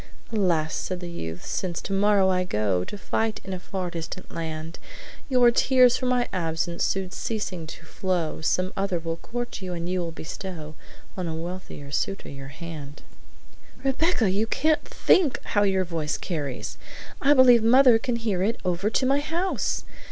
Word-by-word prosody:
"'Alas!' 170 -7 +1
said 185 -1 -3
the 175 -1 -6
youth, 80 - -6
since 175 -3 -2
tomorrow 195 0 +3
I 185 -1 +2
go 105 - 0
To 205 - -7
fight 220 +2 -1
in 190 - -5
a 185 - -4
far 185 -1 -4
distant 170 +2 -6
land, 160 0 -5 0.5
Your 250 -2 +6
tears 250 0 +5
for 255 - -1
my 250 -1 +2
absence 170 -1 -1
soon 190 -1 0
ceasing 185 -8 -3
to 165 - -10
flow, 175 -3 -2
Some 185 +3 +1
other 195 -2 0
will 165 0 -3
court 240 +3 -5
you, 185 -1 -4
and 170 0 -4
you 185 +1 0
will 170 -2 -3
bestow 160 -1 -7 0.4
On 185 -2 -3
a 160 - -3
wealthier 165 -4 -7
suitor 195 +7 -2
your 135 -1 -8
hand.'" 150 -1 -8 0.8
"Rebecca, 270 - +2
you 210 +4 +1
can't 310 +6 +2
THINK 315 -8 +3
how 205 - +1
your 190 -2 +2
voice 160 -3 -2
carries! 145 -8 -4 0.4
I 285 +1 +5
believe 250 -3 +7
mother 245 +1 +6
can 240 +1 -1
hear 220 -6 -1
it 220 +5 0
over 180 +3 +1
to 255 - +1
my 275 +2 +3
house!" 330 +6 -1
185 Hz, 170 wpm, -26 LUFS, 165-225 Hz, 0.8 s, believe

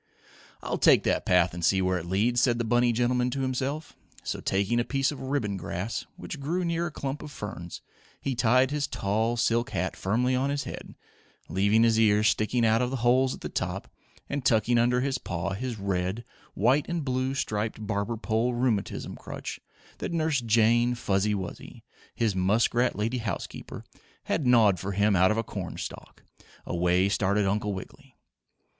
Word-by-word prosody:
"I'll - - -2
take - - +5
that - - 0
path 90 -1 +4
and 85 -1 -6
see 95 +3 +3
where 95 -1 +1
it 85 - -8
leads," 115 +7 +2
said 120 -2 +3
the 120 - -1
bunny 120 +1 +3
gentleman 125 +1 +1
to 135 +2 -3
himself. 135 +4 -3 0.3
So, - - -3
taking 100 +5 0
a - - +2
piece 135 +2 0
of 145 - -8
ribbon 130 -7 -1
grass, 95 +4 -4
which 150 - -7
grew 170 +6 -1
near 170 0 0
a - - -6
clump 140 0 -4
of 150 - -8
ferns, 90 -8 -7 0.4
he 135 - -2
tied 125 +2 +3
his 145 -1 -1
tall 110 +4 -1
silk 120 +1 +1
hat 95 -6 -2
firmly 120 +6 0
on 135 +2 0
his 140 0 -1
head, - - -8 0.5
leaving 100 +4 +3
his 115 -1 +3
ears 105 -1 +4
sticking 115 +2 +1
out 110 +1 +3
of 125 - 0
the 135 - -3
holes 130 +2 +3
at - - -16
the - - -5
top, - - -3 0.4
and 140 -1 -3
tucking 120 0 +3
under 125 +1 +2
his 135 -1 -1
paw 90 +2 -3
his 120 +3 -4
red, 95 +2 -2 0.3
white 130 +8 +2
and 170 -4 -2
blue 130 0 -1
striped 110 -3 -2
barber 100 +3 -2
pole 110 +4 0
rheumatism 120 -5 -1
crutch - - -7 0.4
that - - -3
Nurse 160 -5 +1
Jane 120 +2 +3
Fuzzy 105 -2 0
Wuzzy, 95 -3 -7 0.3
his 110 -4 0
muskrat 115 +6 +2
lady 115 +5 -1
housekeeper, 105 -6 -5 0.4
had 145 - -1
gnawed 110 -6 +5
for 100 +1 -4
him 100 +1 +3
out 95 +1 +5
of 110 - +1
a 115 - 0
cornstalk, - - -7 0.4
away 90 +2 +2
started 100 +1 +1
Uncle 105 +2 0
Wiggily. 95 - -11
115 Hz, 180 wpm, -27 LUFS, 100-130 Hz, 0.5 s, take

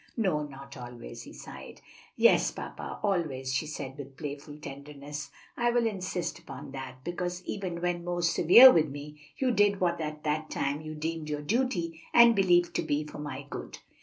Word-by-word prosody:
"No, 185 -9 +1
not 140 -1 -9
always," 120 -1 -9
he - - -11
sighed. - - -10 0.4
"Yes, - - +5
papa, - - -7
always," 150 -10 0
she 150 +4 0
said 140 -2 -6
with 135 -1 -9
playful 145 0 -6
tenderness. 145 +1 -8 0.3
"I 240 0 +2
will 240 -1 +2
insist 185 -4 -2
upon 135 -1 -9
that; 130 -1 -8
because 175 +1 -4
even 185 -4 -4
when 175 -1 -1
most 175 -1 0
severe 235 +10 +10
with 160 -6 +3
me, 150 +2 -9 0.2
you 260 -2 +2
did 205 -3 +3
what 170 -2 +1
at 150 -1 -5
the 155 +1 0
time 140 +2 -1
you 155 0 -7
deemed 160 0 -4
your 150 0 -3
duty, 175 - -1
and 235 -1 +8
believed 175 -3 +4
to - - +1
be 145 +1 0
for 150 - -9
my 145 -2 -6
good." - - -7
155 Hz, 180 wpm, -29 LUFS, 145-180 Hz, 0.4 s, severe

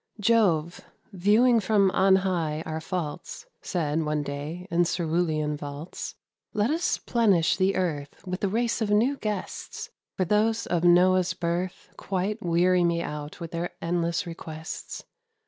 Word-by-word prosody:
Jove, 190 -7 +2 0.3
viewing 215 +6 +4
from 200 -2 +3
on 190 0 +5
high 160 -4 -1
our 160 0 -4
faults, 175 - -5 0.2
Said, 160 -3 -1
one 150 -1 -1
day, 145 +6 -5
in 170 +1 +4
Cerulean 165 -3 0
vaults, 145 +3 -7 0.4
"Let 210 +5 +1
us 330 +3 +1
'plenish 200 -9 +2
the 190 +1 +2
earth 160 -3 -3
With 185 +3 -4
a - - +3
race 230 +4 0
of 215 - 0
new 235 +7 +3
guests; 240 - -5 0.3
For 185 - +1
those 215 +4 +2
of 175 -1 0
Noah's 180 +1 +4
birth 175 +1 -3
Quite 195 +3 -2
weary 175 +1 +3
me 170 0 +1
out 150 +1 -6
with 170 -2 -6
their 170 +1 -3
endless 170 +1 -1
requests. 160 -2 -7
180 Hz, 145 wpm, -26 LUFS, 160-205 Hz, 0.4 s, on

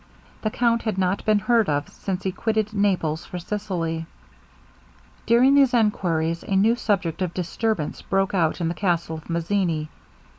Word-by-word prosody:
The 215 - 0
count 235 +1 +1
had 215 -4 -2
not 185 +1 0
been 215 -1 +4
heard 225 0 +2
of 145 0 0
since 190 -2 -4
he 190 - 0
quitted 215 +2 -1
Naples 180 -6 0
for 180 - -7
Sicily. 175 -4 -3 1.2
During 245 +4 +5
these 275 -3 +5
enquiries 170 -7 +1
a 195 - -2
new 215 +5 +4
subject 195 -8 -1
of 180 -2 -2
disturbance 180 -1 -2
broke 195 0 0
out 165 -4 +1
in 170 - 0
the 165 - -1
castle 170 -2 -1
of 160 - -13
Mazzini. 170 -2 -1
190 Hz, 160 wpm, -24 LUFS, 165-215 Hz, 1.2 s, During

